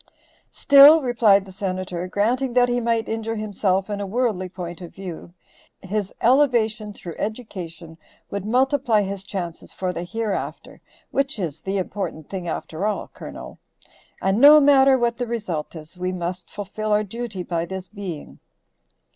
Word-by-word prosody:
"Still," 285 Hz, +3 st, +8 dB
replied 220 Hz, -6 st, +4 dB
the 190 Hz, -, -12 dB
Senator, 185 Hz, -2 st, -4 dB
"granting 240 Hz, +7 st, 0 dB
that 245 Hz, 0 st, +4 dB
he 245 Hz, 0 st, +1 dB
might 230 Hz, -1 st, 0 dB
injure 225 Hz, 0 st, -3 dB
himself 200 Hz, -3 st, 0 dB
in 205 Hz, -1 st, -4 dB
a 200 Hz, -, -3 dB
worldly 210 Hz, -4 st, -1 dB
point 175 Hz, -1 st, -7 dB
of 175 Hz, -, -10 dB
view, 180 Hz, -3 st, -8 dB, 0.5 s
his 200 Hz, 0 st, -2 dB
elevation 235 Hz, -5 st, +3 dB
through 175 Hz, -4 st, -9 dB
education 175 Hz, -7 st, -6 dB, 0.3 s
would 200 Hz, -1 st, -3 dB
multiply 250 Hz, -1 st, +2 dB
his 195 Hz, 0 st, -4 dB
chances 175 Hz, -4 st, -6 dB
for 185 Hz, -1 st, -3 dB
the 170 Hz, -, -4 dB
hereafter 215 Hz, +2 st, -4 dB, 0.3 s
which 275 Hz, -1 st, 0 dB
is 165 Hz, -6 st, -4 dB
the 195 Hz, +1 st, -2 dB
important 180 Hz, -5 st, -4 dB
thing 185 Hz, -3 st, -4 dB
after 165 Hz, +1 st, -4 dB
all, 215 Hz, -, -3 dB
Colonel. -, -, -9 dB, 0.6 s
And 195 Hz, +4 st, +1 dB
no 295 Hz, +2 st, +10 dB
matter 275 Hz, -2 st, +6 dB
what 235 Hz, -1 st, 0 dB
the 245 Hz, -, -2 dB
result 195 Hz, -10 st, -4 dB
is, 160 Hz, +3 st, -11 dB
we 180 Hz, 0 st, -1 dB
must 180 Hz, 0 st, -5 dB
fulfill 210 Hz, +1 st, -5 dB
our 210 Hz, 0 st, +3 dB
duty 215 Hz, -2 st, -5 dB
by 170 Hz, -1 st, -2 dB
this 190 Hz, +1 st, -6 dB
being." 190 Hz, -6 st, -8 dB
200 Hz, 155 wpm, -23 LUFS, 185-235 Hz, 0.6 s, no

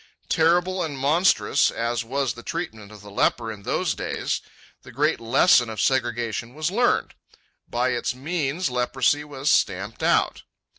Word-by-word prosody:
Terrible 175 Hz, +3 st, +2 dB
and 150 Hz, -5 st, -3 dB
monstrous 140 Hz, -, +3 dB
as 115 Hz, 0 st, -2 dB
was 135 Hz, 0 st, -1 dB
the 120 Hz, -, -11 dB
treatment 110 Hz, -, -6 dB
of 105 Hz, -2 st, -12 dB
the 105 Hz, 0 st, -12 dB
leper 115 Hz, +3 st, 0 dB
in 105 Hz, -2 st, -9 dB
those -, -, -1 dB
days, -, -, -3 dB, 0.4 s
the -, -, -13 dB
great -, -, +1 dB
lesson 120 Hz, +1 st, +4 dB
of 110 Hz, -, -6 dB
segregation 120 Hz, -2 st, -1 dB
was 155 Hz, +2 st, -1 dB
learned. 240 Hz, +5 st, +1 dB, 0.6 s
By 125 Hz, +2 st, 0 dB
its 125 Hz, 0 st, -1 dB
means 150 Hz, +2 st, -2 dB
leprosy 130 Hz, +4 st, +1 dB
was 145 Hz, -1 st, -1 dB
stamped 100 Hz, +3 st, 0 dB
out. -, -, +2 dB
130 Hz, 150 wpm, -24 LUFS, 115-155 Hz, 0.6 s, lesson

